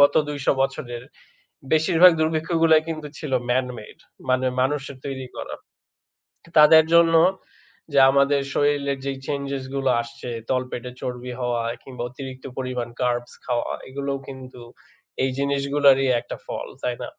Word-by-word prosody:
গত 145 - +6
২০০ 145 -2 -5
বছরের 125 -3 -2 0.7
বেশিরভাগ 165 +3 +6
দুর্ভিক্ষগুলা 160 0 +3
কিন্তু 155 -2 -4
ছিল 150 -4 -6 0.2
ম্যান 130 +1 +2
মেড। 105 - -12 0.3
মানে 130 0 +2
মানুষের 140 0 -1
তৈরি 130 -2 -5
করা। - - -6 1.0
তাদের 160 +1 +8
জন্য 170 -1 +6 0.8
যে 140 - +3
আমাদের 140 +1 +3
শরীরের 140 -1 +1
যে 140 - -1
চেঞ্জেস 140 -2 -3
গুলো 135 -1 +1
আসছে 120 +1 -8 0.2
তলপেটে 125 -1 -2
চর্বি 125 0 -5
হওয়া 120 -1 0 0.2
কিংবা 125 -2 -8
অতিরিক্ত 130 0 -9
পরিমাণ 125 -2 -3
কার্বস 120 -1 -1
খাওয়া 120 -1 -1 0.2
এগুলোও 140 +1 -3
কিন্তু 130 -2 -10 0.6
এই 130 - +1
জিনিসগুলোরই 140 -1 +3
একটা 120 - -8
ফল। - - -5 0.2
তাই 125 - -1
না? - - -4
135 Hz, 135 wpm, -23 LUFS, 125-145 Hz, 1.0 s, তাদের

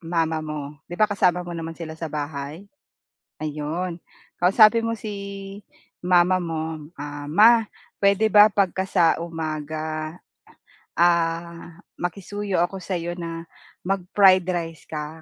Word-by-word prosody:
mama 165 -1 -1
mo, 150 -2 -6
'di 175 - -6
ba 215 - +5
kasama 180 -4 +1
mo 175 - -7
naman 165 -1 -6
sila 160 -2 -7
sa 165 - -4
bahay? 150 +3 -5 0.8
Ayun, 155 +4 -3 0.4
kausapin 215 +5 +5
mo 230 - -1
si 200 -2 -7 0.4
mama 180 +1 +3
mo, 160 -2 -4 0.2
ah, 145 0 -7
"Ma, 220 +7 +6 0.3
puwede 200 +2 +3
ba 210 0 +9
'pagka 190 -2 0
sa 180 -3 +3 0.2
umaga, 155 -1 -4 0.8
ah, 170 0 0 0.2
makisuyo 200 +2 -3
ako 185 +2 -1
sa 185 - -2
'yo 175 +1 -4
na 165 -1 -6 0.4
mag-fried 190 0 +4
rice 165 -2 -3
ka, 155 +1 -6
170 Hz, 125 wpm, -23 LUFS, 160-195 Hz, 0.8 s, ba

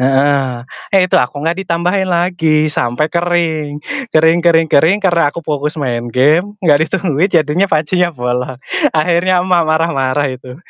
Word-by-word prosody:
Heeh. 135 -2 +1 0.3
Eh, 195 - +5
itu - - +1
aku 125 - -3
nggak 170 +3 -1
ditambahin 180 +3 -1
lagi 170 -3 +1
sampai 120 +5 0
kering. 170 -3 -1 0.4
Kering 160 +2 +4
kering 165 -1 +4
kering, 165 +8 +4
karena 170 -5 +2
aku 170 - -6
fokus 150 +1 -3
main 120 -4 -3
game, 155 - +1
nggak 150 -3 +4
ditungguin, 175 -1 0
jadinya 165 +2 +1
pancinya 170 +3 +1
bolong. 125 -1 -3 0.4
Akhirnya 175 +3 +2
emak 180 -2 +2
marah-marah 145 -4 0
itu. 125 0 -10
160 Hz, 145 wpm, -14 LUFS, 140-175 Hz, 0.4 s, Eh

